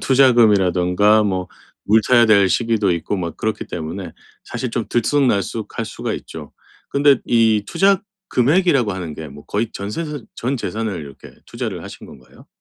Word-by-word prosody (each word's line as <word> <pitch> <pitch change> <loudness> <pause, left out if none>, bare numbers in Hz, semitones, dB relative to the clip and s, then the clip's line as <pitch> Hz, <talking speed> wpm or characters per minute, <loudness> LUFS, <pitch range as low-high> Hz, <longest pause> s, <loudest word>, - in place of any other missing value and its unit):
투자금이라든가 105 -6 +4
뭐 95 -3 -2 0.4
물 110 +2 +5
타야 120 -2 +5
될 100 -3 +5
시기도 110 -2 +1
있고 85 +4 -2
뭐 85 -3 -3
그렇기 110 +5 -3
때문에 85 +2 -6 0.3
사실 130 - -5
좀 115 -2 -2
들쑥날쑥할 120 -4 0
수가 - - -5
있죠. - - -9 0.4
근데 140 -2 +4
이 110 -3 +3
투자 195 - +2 0.3
금액이라고 135 - +2
하는 90 -5 -6
게 80 -1 -8
뭐 70 +1 -13
거의 110 +2 -2
전세산 145 +7 -5
전 130 +3 -2
재산을 110 -4 -3
이렇게 70 -3 -12 0.2
투자를 - - -5
하신 - - -11
건가요? - - -17
110 Hz, 335 characters per minute, -19 LUFS, 95-125 Hz, 0.4 s, 물